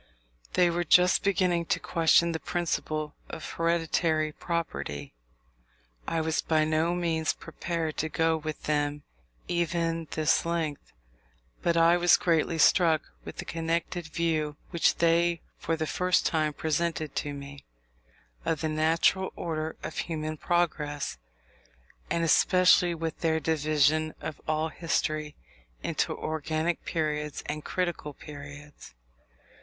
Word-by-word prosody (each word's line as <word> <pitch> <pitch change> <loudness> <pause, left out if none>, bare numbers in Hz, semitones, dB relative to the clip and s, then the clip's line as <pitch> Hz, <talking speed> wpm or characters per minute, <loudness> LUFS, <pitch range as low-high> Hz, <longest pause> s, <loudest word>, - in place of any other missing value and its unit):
They 175 -1 +4
were 175 +1 0
just 180 +2 +5
beginning 180 -3 +2
to - - +1
question 170 +1 +3
the 160 - -3
principle 155 -3 -2 0.2
of 160 -3 -6
hereditary 165 -2 +1
property. 75 - -4 0.9
I 165 - 0
was 160 0 0
by 155 -1 +2
no 160 +3 +1
means 165 -2 0
prepared 165 -3 -4
to 160 - -1
go 160 0 +2
with 155 -1 -5
them 145 -1 -1 0.4
even 165 -1 -1
this 155 0 +2
length; 165 -3 -3 0.7
but 170 -1 +1
I 165 +1 +6
was 175 0 +5
greatly 165 -1 +1
struck 160 -1 +4
with - - -9
the - - -5
connected 165 +1 -2
view 155 -2 -1
which 170 -3 +3
they 170 0 +2 0.2
for 165 - -1
the 160 0 -2
first 180 +3 +1
time 155 -2 +1
presented 160 0 -1
to 145 - -1
me, 140 0 -9 0.8
of 160 -2 -1
the 160 - 0
natural 160 +4 +2
order 160 -1 -3
of - - -4
human 155 -1 -3
progress; 150 - -1 0.9
and 170 - 0
especially 180 +1 +5
with 165 -1 -4
their 160 -1 +1
division 155 0 +2
of 155 - -6
all 155 +1 0
history 155 -2 -2 0.5
into - - 0
organic 155 +2 -2
periods 150 -2 -2
and 150 0 -4
critical 175 -5 -2
periods. 145 - -11
160 Hz, 130 wpm, -28 LUFS, 155-170 Hz, 0.9 s, I